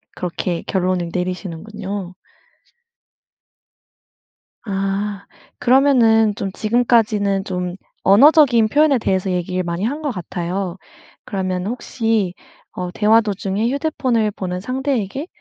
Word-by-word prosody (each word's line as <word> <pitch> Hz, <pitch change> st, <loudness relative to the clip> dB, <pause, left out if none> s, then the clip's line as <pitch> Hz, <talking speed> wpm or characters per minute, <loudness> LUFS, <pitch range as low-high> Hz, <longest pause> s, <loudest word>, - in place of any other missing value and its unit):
그렇게 175 Hz, -1 st, -3 dB
결론을 185 Hz, -2 st, 0 dB
내리시는군요. 185 Hz, +2 st, -5 dB, 2.5 s
아. 195 Hz, 0 st, -2 dB, 0.3 s
그러면은 240 Hz, -5 st, +4 dB
좀 195 Hz, -1 st, -4 dB
지금까지는 215 Hz, -3 st, +1 dB
좀 180 Hz, -1 st, -3 dB, 0.3 s
언어적인 250 Hz, -, +6 dB
표현에 295 Hz, +1 st, +4 dB
대해서 190 Hz, -4 st, 0 dB
얘기를 180 Hz, +1 st, -1 dB
많이 170 Hz, +2 st, -3 dB
한 285 Hz, +7 st, -2 dB
것 300 Hz, -, -2 dB
같아요. 180 Hz, -1 st, -4 dB, 0.5 s
그러면 185 Hz, -1 st, -2 dB
혹시 225 Hz, -4 st, -1 dB, 0.4 s
어 180 Hz, -1 st, -4 dB
대화 220 Hz, +4 st, +4 dB
도중에 205 Hz, +1 st, -2 dB
휴대폰을 260 Hz, -6 st, 0 dB
보는 180 Hz, -3 st, -4 dB
상대에게 260 Hz, -, -2 dB
200 Hz, 255 characters per minute, -19 LUFS, 185-235 Hz, 2.5 s, 언어적인